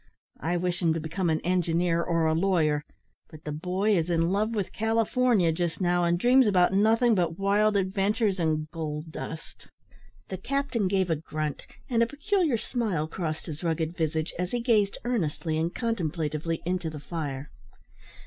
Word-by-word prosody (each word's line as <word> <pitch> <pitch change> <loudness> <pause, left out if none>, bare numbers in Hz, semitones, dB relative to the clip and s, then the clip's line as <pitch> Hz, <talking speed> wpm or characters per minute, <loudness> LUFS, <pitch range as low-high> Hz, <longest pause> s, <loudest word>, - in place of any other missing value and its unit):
I 175 +4 -1
wish 180 +1 -1
him 165 -2 +3
to - - -1
become 165 +3 -2
an 160 0 +1
engineer 170 -1 +1
or 165 -1 +1
a 160 - +3
lawyer, 160 -4 +2 0.5
but 155 0 -13
the 150 - -4
boy 185 +7 0
is 170 -1 0
in 165 0 +2
love 215 +3 0
with 200 -4 -2
California 225 -3 +2
just 170 0 -2
now, 175 -1 +2
and 170 0 +2
dreams 250 +5 +5
about 185 -2 +3
nothing 225 +4 +4
but 175 -4 0
wild 205 +2 +2
adventures 195 +1 +1
and 155 -2 0
gold 155 -1 -5
dust." 160 0 -8 0.6
The 190 - -4
captain 255 -1 -1
gave 190 -2 +1
a - - +3
grunt, 155 -1 -4 0.3
and 235 -2 +1
a 230 - +4
peculiar 300 - +1
smile 210 -10 -2
crossed 160 -2 -4
his 155 0 -7
rugged 165 0 -1
visage 160 -1 -1
as 180 0 -1
he 245 - +1
gazed 215 -4 +2
earnestly 170 -9 -1
and 165 +2 0
contemplatively 165 - -2
into 180 -2 -1
the 155 -1 -7
fire. 145 -3 -5
175 Hz, 170 wpm, -27 LUFS, 160-210 Hz, 0.6 s, dreams